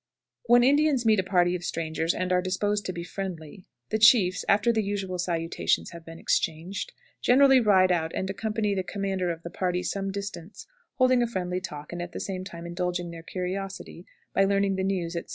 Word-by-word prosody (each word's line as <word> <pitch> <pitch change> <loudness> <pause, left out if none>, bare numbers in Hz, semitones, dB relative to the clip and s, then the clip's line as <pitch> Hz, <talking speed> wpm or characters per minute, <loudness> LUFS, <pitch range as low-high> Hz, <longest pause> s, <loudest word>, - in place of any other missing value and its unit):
When 240 +1 +6
Indians 285 -1 +3
meet 215 -2 +4
a - - +1
party 180 -2 +2
of 175 - -5
strangers, 165 -1 -2
and 185 0 -2
are 180 - +3
disposed 205 +3 -1
to - - -1
be 170 -1 -6
friendly, 180 -2 -7 0.3
the 220 - +1
chiefs, 210 -4 +5
after 210 +4 +4
the 220 - +1
usual 195 -3 -3
salutations 170 -1 -1
have 170 -1 -10
been 165 0 -10
exchanged, 165 +5 -2 0.3
generally 270 +1 +6
ride 190 -5 +4
out 165 -2 0
and 190 - -2
accompany 210 +1 -1
the 190 - 0
commander 190 -1 -2
of 165 -1 -5
the 170 - -7
party 180 0 -1
some 195 0 -2
distance, 200 -1 -7 0.3
holding 255 -1 +4
a 240 - +2
friendly 185 -4 -3
talk, 150 -3 -7
and, 175 - -4
at 175 0 -7
the - - -5
same 185 -2 -4
time, 170 -3 -9
indulging 175 0 -3
their 165 -1 -9
curiosity 185 +1 -6 0.3
by 195 - +4
learning 195 0 +2
the 190 - -1
news, 180 -3 -2
etc. 170 - -5
185 Hz, 200 wpm, -27 LUFS, 175-205 Hz, 0.3 s, When